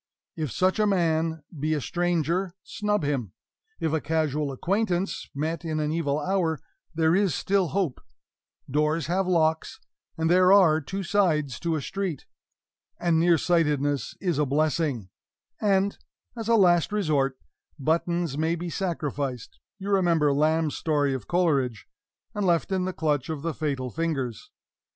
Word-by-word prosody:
If 155 -6 -3
such 185 - +1
a 210 - +3
man 160 -4 +1 0.2
be 155 +2 0
a - - -1
stranger, 175 +3 -1
snub 210 -4 -1
him; 135 -10 -2 0.5
if 160 -1 -1
a 160 - +1
casual 150 -2 0
acquaintance, 190 - -1
met 160 +3 -2
in 155 -2 -2
an 150 0 -1
evil 155 -3 0
hour, 170 -1 0 0.4
there 160 +1 +3
is 195 -7 +2
still 195 -2 +1
hope 180 -7 -1 0.7
doors 150 +2 +1
have 185 +3 0
locks, 160 -3 +1 0.4
and 160 0 0
there 180 +2 +5
are 170 -6 +6
two 190 +7 -5
sides 160 - +1
to 170 -1 -1
a 150 - -3
street, 190 -6 -4 0.7
and 170 -2 +2
nearsightedness 155 -4 +2
is 175 -6 -1
a 150 - +3
blessing, 145 - 0 0.5
and 200 -1 +2 0.4
(as 225 -2 -5
a 230 - +4
last 175 -5 +4
resort) 150 -10 +1 0.4
buttons 165 0 0
may 160 +2 +1
be 170 0 -5
sacrificed 145 - -3 0.2
(you 200 +1 -5
remember 170 -7 +3
Lamb's 155 +1 +1
story 145 -4 +1
of 130 -6 -5
Coleridge) 140 - +1 0.5
and 205 - -2
left 170 0 +1
in 185 -1 0
the 185 - -1
clutch 150 -5 -1
of 155 -3 -4
the 165 -1 -1
fatal 135 -5 -3
fingers. 135 - -3
160 Hz, 150 wpm, -26 LUFS, 145-180 Hz, 0.7 s, are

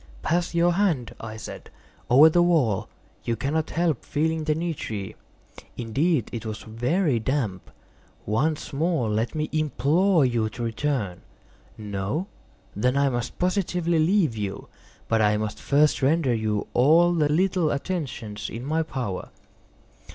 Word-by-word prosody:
"Pass 170 +1 0
your 170 +1 +4
hand," 170 - 0
I 110 0 -7
said, 110 - -9 0.4
"over 140 +6 +8
the 175 +2 +4
wall; 155 - +2 0.3
you 115 - -1
cannot 150 +6 -1
help 165 -5 0
feeling 160 +1 -1
the 155 -1 +1
nitre. 145 - -4 0.6
Indeed 130 - 0
it 115 - -4
is 110 -1 -6
very 125 - 0
damp. 110 - -2 0.6
Once 145 +9 -1
more 145 -6 0
let 110 +7 -1
me 155 0 -1
implore 155 +3 +2
you 115 -3 0
to 120 - -6
return. 115 -5 -2 0.6
No? 105 - -3 0.5
Then 125 +6 +1
I 140 0 +3
must 120 -1 -3
positively 180 -2 0
leave 160 - +2
you. 100 -2 -5 0.4
But 115 -1 +2
I 105 0 +3
must 105 -1 -4
first 145 +1 +2
render 140 -1 +2
you 110 -2 -1
all 165 +7 +5
the 155 -3 +2
little 180 0 +2
attentions 140 - -4
in 120 +3 -6
my 160 +3 +1
power." 125 -12 -4
140 Hz, 140 wpm, -25 LUFS, 115-165 Hz, 0.6 s, over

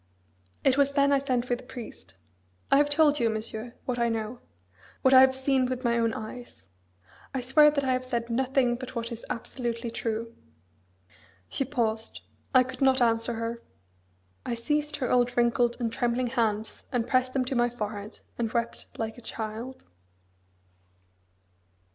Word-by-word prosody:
It 270 -1 +4
was 280 0 +3
then 280 0 +4
I 280 - +4
sent 255 -3 0
for 245 - 0
the 245 - -10
priest. 245 - -10 0.6
I - - +7
have 290 0 +4
told 295 0 +4
you, 230 - +2
Monsieur, 220 +2 -4
what 245 -1 -2
I 235 0 +2
know; 225 +1 -3 0.6
what 260 - +5
I 260 - +10
have 265 0 +5
seen 265 -1 +2
with 255 0 -3
my 235 -1 +2
own 230 -1 +2
eyes. 220 - -9 0.7
I 260 - 0
swear 300 +4 +6
that 290 -1 -1
I 260 -1 +2
have 255 0 -1
said 235 -2 -2
nothing 255 0 +2
but 260 0 -8
what 230 0 -3
is 235 0 -7
absolutely 235 -1 -3
true." 230 0 -3 1.2
She - - -1
paused. 225 -4 -2 0.3
I 255 -2 +6
could 260 +2 -9
not 265 0 +4
answer 230 0 +2
her. 230 +1 -4 0.8
I 240 - -2
seized 295 +5 -1
her 255 -4 -2
old 245 -1 +2
wrinkled 240 0 +3
and 230 -2 -1
trembling 245 +1 0
hands 220 -3 -1
and 245 -3 0
pressed 255 0 +2
them 260 -2 +1
to 260 - -2
my 240 0 +3
forehead, 210 -3 -6 0.2
and 230 -2 -1
wept 235 0 -2
like 225 +1 -4
a - - -14
child. 225 +3 -6
245 Hz, 170 wpm, -28 LUFS, 230-260 Hz, 1.2 s, I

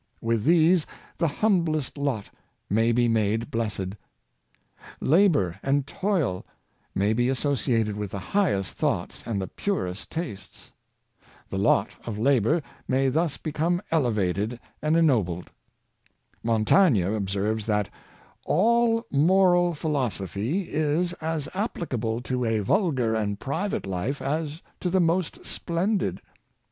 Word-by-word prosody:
With 115 -1 0
these, 165 +1 +4 0.3
the 165 - +3
humblest 160 -4 +1
lot 140 -8 -2 0.4
may 115 +3 +3
be 120 +1 +3
made 110 0 0
blessed» 105 -5 -2 1.1
Labor 145 - +3
and 140 0 +1
toil 165 - -1 0.5
may 100 +3 +2
be 120 +2 +1
associated 125 -6 0
with 105 -1 -4
the 100 - -5 0.2
highest 135 - +1
thoughts - - -2
and 110 -4 -1
the 95 - -2
purest 105 - -3
tastes. 105 - -7 0.8
The 95 - -2
lot 100 0 +2
of 115 -3 -5
labor 135 +6 +2 0.2
may 135 +1 +2
thus 160 +2 0
become 160 +3 -1
elevated 110 - 0 0.2
and 155 +2 +2
ennobled. 105 - +1 0.9
Montaigne 115 - +4
ob 100 +1 -1
serves 105 +2 -1
that 105 -2 +1 0.3
" - - -30
all 230 +5 +3
moral 175 +3 +4
philosophy 130 - -1
is 155 +4 +1
as 160 -2 -2
applicable 125 - -2
to 125 0 -2
a 115 -1 +1
vulgar 130 - +1
and 105 -2 -1
private 165 - -2
life 95 +9 -2
as 155 +3 -3 0.2
to 180 - -1
the 190 +2 +2
most 170 0 0
splendid. 185 +4 -1
135 Hz, 125 wpm, -26 LUFS, 110-165 Hz, 1.1 s, these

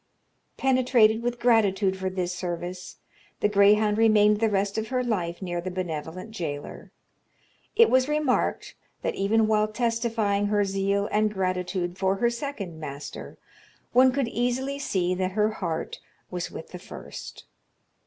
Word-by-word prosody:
Penetrated 250 -4 +3
with 240 0 -2
gratitude 205 -5 +3
for 190 0 -3
this 180 -1 -2
service, 180 0 -5 0.4
the - - +3
greyhound 210 +1 +4
remained 210 -2 +5
the 225 0 +2
rest 200 0 0
of 220 - -4
her 255 +1 -1
life 185 -7 -2
near 175 -1 -3
the 185 - -4
benevolent 180 +2 -5
jailor. 150 -9 -6 0.9
It 460 +1 +7
was 260 0 +3
remarked, 300 -3 0 0.3
that - - 0
even 215 +3 +2
while 215 0 +2
testifying 225 -2 0
her 205 -1 +2
zeal 195 +1 0
and 210 0 +2
gratitude 185 -1 -2
for 190 0 +2
her 235 +4 +1
second 235 - -5
master, 140 -1 -8 0.6
one 255 +1 +6
could 270 -1 0
easily 250 +4 -1
see 185 -9 0
that 185 0 -2
her 215 +1 +2
heart 170 -6 -4 0.3
was 180 -1 -3
with 160 - -9
the 180 - -8
first. 185 - -10
205 Hz, 145 wpm, -26 LUFS, 185-230 Hz, 0.9 s, It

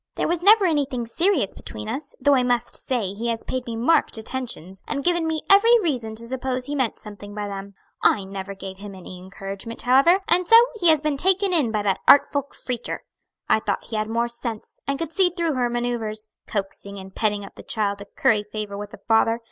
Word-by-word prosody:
There - - 0
was 345 0 0
never 410 +2 +6
anything 280 -7 0
serious 305 - +1
between 105 0 -8
us, 285 0 -5
though 285 +1 +4
I 260 - +4
must 245 -1 0
say 225 -7 -1
he 225 +4 -4
has 230 -1 -2
paid 255 -1 -4
me 230 - -4
marked 240 +3 +2
attentions, 220 -6 -4
and 280 -1 -2
given 345 0 +2
me 320 -1 -1
every 455 +4 +7
reason 240 -9 -2
to 230 - -3
suppose 255 +1 -2
he 290 - -3
meant 260 -5 0
something 205 -1 -9
by 210 -1 -3
them. 200 0 -7 0.3
I 200 - +3
never 195 0 -6
gave 190 -1 -8
him 200 0 -9
any 185 0 -10
encouragement, 195 +4 -7
however; 270 +9 +5
and 355 +1 +2
so 455 - +7 0.2
he 350 - +3
has 310 -2 +4
been 300 -2 -1
taken 380 +4 +2
in 300 -9 +3
by 210 -2 -1
that 195 -2 +1
artful 285 0 +6
creature. 250 -3 -6 0.4
I - - +4
thought 200 -2 -3
he 225 - -4
had 215 0 -1
more 235 +2 0
sense, 235 -2 -7
and 280 0 0
could 325 +1 -4
see 380 -2 +4
through 335 -2 +1
her 250 -2 0
manoeuvers 235 -3 -2 0.2
coaxing 200 0 -4
and 190 0 -10
petting 210 -2 -1
up - - -13
the - - -12
child 200 -2 -2
to 200 - -8
curry 210 +1 +1
favor 210 -1 -6
with 205 0 -6
the - - -13
father! 225 +1 +3
235 Hz, 220 wpm, -23 LUFS, 205-285 Hz, 0.4 s, every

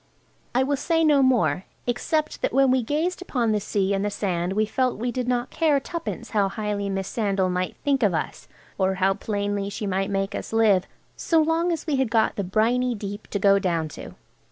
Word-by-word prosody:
I 255 - +4
will 280 +1 0
say 325 +3 +1
no 295 -3 +5
more, 195 - +2 0.2
except 300 +6 -1
that - - -1
when 270 0 +4
we 260 0 +3
gazed 315 +10 -1
upon 245 -10 0
the 210 - +1
sea 200 -1 0
and 195 0 0
the 205 - 0
sand 185 -3 -2
we 215 +2 +2
felt 255 +3 0
we 240 +3 -2
did 250 0 -3
not 245 +1 -1
care 305 -3 +2
tuppence 335 +4 -6
how 205 -3 +2
highly 205 -1 -3
Miss 195 -1 -2
Sandal 195 -4 0
might 180 0 -2
think 280 -2 +1
of 200 -6 +3
us 160 - -4 0.3
or 190 0 +2
how 190 +1 +2
plainly 205 -1 -2
she 210 +1 -5
might 195 0 -1
make 195 0 -1
us - - -5
live, 215 -5 +4 0.3
so 330 - +2
long 325 +2 +2
as 325 -2 -3
we 300 -4 0
had 265 -3 +1
got 225 -1 +2
the 200 - -2
briny 235 +6 +1
deep 205 0 -7
to - - -2
go 200 0 +4
down 170 -5 -1
to. - - -10
215 Hz, 215 wpm, -24 LUFS, 195-265 Hz, 0.3 s, no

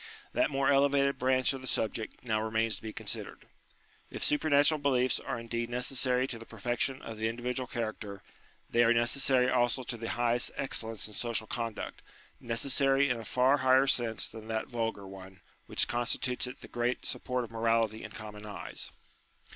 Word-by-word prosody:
That - - +2
more 135 -1 +1
elevated 140 0 +3
branch 130 +1 +3
of 135 - -6
the 130 - -7
subject 110 -1 -2
now 110 -2 +1
remains 110 0 0
to - - -10
be 110 - -5
considered. - - -5 0.7
Jf - - -3
supernatural 150 0 +4
beliefs 130 -3 +2
are 120 - -4
indeed 115 0 -3
necessary 125 +1 +2
to 125 -3 -6
the 115 - -10
perfection 120 +4 -2
of 110 -1 -7
the 110 - +1
individual 125 +2 -3
character, 110 -4 -5 0.4
they 120 - +3
are 120 0 +4
neces 120 +3 +2
sary 130 -2 +4
also 125 0 +2
to 120 - -4
the 115 0 -4
highest 120 0 +1
excellence 115 -6 -1
in 105 - -12
social 115 0 0
conduct: 115 0 -4 0.4
necessary 135 +3 +2
in 120 - -1
a - - -7
far 130 +5 +3
higher 130 0 +5
sense 120 -5 +2
than 110 -1 -10
that 110 0 -1
vulgar 115 -5 -3
one, 95 0 -11 0.3
which - - +2
constitutes 120 +1 -1
it 125 - -9
the - - -10
great 120 +1 -1
support 125 -1 -1
of 115 - -9
morality 115 -1 +1
in - - -6
common 105 -1 -9
eyes. 105 -1 -7
120 Hz, 180 wpm, -31 LUFS, 115-130 Hz, 0.7 s, higher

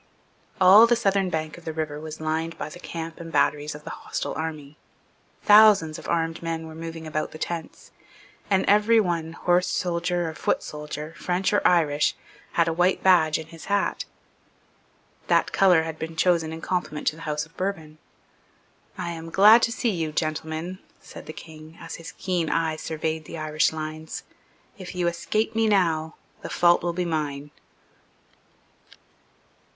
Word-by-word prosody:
All 195 +5 +8
the 240 - +4
southern 195 -4 +1
bank 155 -1 -4
of - - -19
the 160 - -4
river 155 -2 -3
was 155 0 -8
lined 160 +1 -2
by 145 - -5
the 175 - -11
camp 165 -2 -7
and 165 -1 -8
batteries 145 +1 +1
of 150 - -11
the - - -7
hostile - - -4
army. 155 -2 -5 0.7
Thousands 205 -7 +6
of - - -9
armed 165 -1 -1
men 165 -1 -3
were 160 - -9
moving 165 0 -7
about 155 -1 -2
among - - -12
the - - -8
tents; 165 0 -6 0.6
and 195 -2 +2
every 210 +3 +5
one, 170 -5 -1
horse 175 +1 +1
soldier 175 0 -1
or 160 - -4
foot - - -1
soldier, 150 +1 -7
French 185 +3 -1
or 205 - +3
Irish, 150 -4 +2 0.4
had 170 -1 +2
a 165 - +1
white 180 +3 +1
badge 165 -5 +5
in 160 - -7
his 165 -1 -11
hat. 200 0 0 1.2
That - - +2
colour 180 -4 +4
had 160 -1 -6
been 160 0 -5
chosen 165 -1 +2
in 160 0 -7
compliment 175 -5 -3
to - - -9
the - - -12
House 150 0 -1
of 165 +2 -24
Bourbon. 160 -5 -4 1.0
"I 170 - -3
am 165 0 -7
glad 210 +6 +7
to 230 - +1
see 235 -1 0
you, 165 -5 -2
gentlemen," 160 +3 -3 0.2
said - - -12
the - - -5
King, 155 0 -12
as 165 - -8
his 165 +1 -10
keen 180 -4 -1
eye 165 -1 0
surveyed 160 0 -3
the 165 - -8
Irish 155 0 +1
lines. 155 0 -6 0.6
"If 185 0 -8
you 175 -1 0
escape 175 +6 -1
me 225 0 +2
now, 165 -6 +1 0.3
the - - -7
fault 175 0 +4
will 175 - -1
be 180 +1 -2
mine." 150 -3 -3
165 Hz, 175 wpm, -25 LUFS, 155-180 Hz, 1.2 s, All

